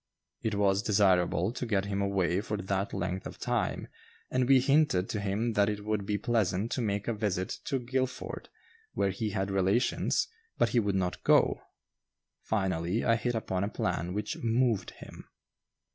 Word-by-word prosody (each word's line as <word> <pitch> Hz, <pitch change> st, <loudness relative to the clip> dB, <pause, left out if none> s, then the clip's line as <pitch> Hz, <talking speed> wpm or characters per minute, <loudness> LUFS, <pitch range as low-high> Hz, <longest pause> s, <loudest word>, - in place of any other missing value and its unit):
It 110 Hz, -2 st, -1 dB
was 100 Hz, -1 st, +2 dB
desirable 95 Hz, -2 st, +2 dB
to 125 Hz, -, -4 dB
get 100 Hz, -3 st, +1 dB
him 100 Hz, 0 st, -2 dB
away 95 Hz, -2 st, +1 dB
for 105 Hz, 0 st, -3 dB
that 100 Hz, 0 st, -2 dB
length 95 Hz, +2 st, -3 dB
of -, -, -10 dB
time, -, -, -1 dB, 0.4 s
and 130 Hz, -1 st, +1 dB
we 135 Hz, -1 st, +7 dB
hinted 135 Hz, -8 st, +3 dB
to 105 Hz, -, -2 dB
him 105 Hz, +4 st, -1 dB
that 100 Hz, -1 st, +3 dB
it 105 Hz, -1 st, -4 dB
would 105 Hz, -2 st, -1 dB
be 105 Hz, -, +1 dB
pleasant 110 Hz, -3 st, 0 dB
to 130 Hz, -, -1 dB
make 105 Hz, -2 st, -1 dB
a 115 Hz, -, +1 dB
visit 100 Hz, -4 st, -2 dB
to 135 Hz, -, 0 dB
Guilford, 130 Hz, +1 st, -3 dB, 0.4 s
where 100 Hz, -, +1 dB
he 105 Hz, +3 st, -2 dB
had 95 Hz, -1 st, -2 dB
relations, 95 Hz, +5 st, +1 dB, 0.3 s
but -, -, +3 dB
he 120 Hz, -, +3 dB
would 100 Hz, -3 st, 0 dB
not 90 Hz, -1 st, -1 dB
go. -, -, +4 dB, 0.8 s
Finally, 95 Hz, -1 st, -1 dB
I 115 Hz, -, +4 dB
hit 120 Hz, +1 st, -1 dB
upon 95 Hz, -4 st, -1 dB
a 100 Hz, -, -1 dB
plan 90 Hz, -3 st, -2 dB
which 105 Hz, 0 st, -3 dB
"moved" 115 Hz, -1 st, +1 dB
him. -, -, -12 dB
105 Hz, 175 wpm, -30 LUFS, 95-115 Hz, 0.8 s, we